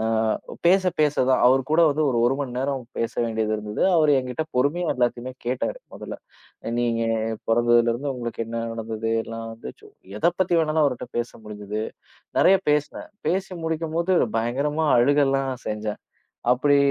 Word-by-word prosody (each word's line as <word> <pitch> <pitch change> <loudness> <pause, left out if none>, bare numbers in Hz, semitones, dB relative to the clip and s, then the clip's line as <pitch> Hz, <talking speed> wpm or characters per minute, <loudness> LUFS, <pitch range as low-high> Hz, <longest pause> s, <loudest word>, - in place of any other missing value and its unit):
அ, - - -1 0.6
பேச 190 +2 +5 0.2
பேச 150 -1 +3
தான் 130 - +3
அவர் 130 +2 +5
கூட 160 +2 +4
வந்து 150 +2 0
ஒரு 120 -3 +1
1 125 - +3
மணி 135 -3 -3
நேரம் 135 0 -1 0.2
பேச 115 - -1
வேண்டியது 110 -1 -1
இருந்தது. 105 0 -4
அவரு, 155 -2 +4
என்கிட்ட 130 +4 -3
பொறுமையா 155 +7 +1
எல்லாத்தையுமே 125 0 -1
கேட்டாரு. 125 - -2
முதல்ல, - - -7 0.6
நீங்க 115 -1 0 0.5
பொறந்ததுலருந்து 120 +3 +2
உங்களுக்கு 120 -2 -4
என்ன 115 0 -4
நடந்தது 115 0 -4 0.2
எல்லாம், 115 0 -6
வந்து 115 - -8
சோ - - -15 0.3
எதை 170 - +3
பத்தி 185 -2 +2
வேணாலும் 155 0 +1
அவர் 140 -3 +2
கிட்ட - - -8
பேச 120 - -2
முடிஞ்சது 105 0 -5 0.6
நிறைய 195 - +6
பேசுனேன். 150 0 -1 0.2
பேசி 190 +3 -1
முடிக்கும் 160 0 -2
போது 170 +2 +1 0.2
பயங்கரமா 145 +7 0
அழுகலாம் 135 +1 +3
செஞ்சேன். 105 0 -4 0.5
அப்படி 145 +3 +3
130 Hz, 155 wpm, -24 LUFS, 115-150 Hz, 0.6 s, நிறைய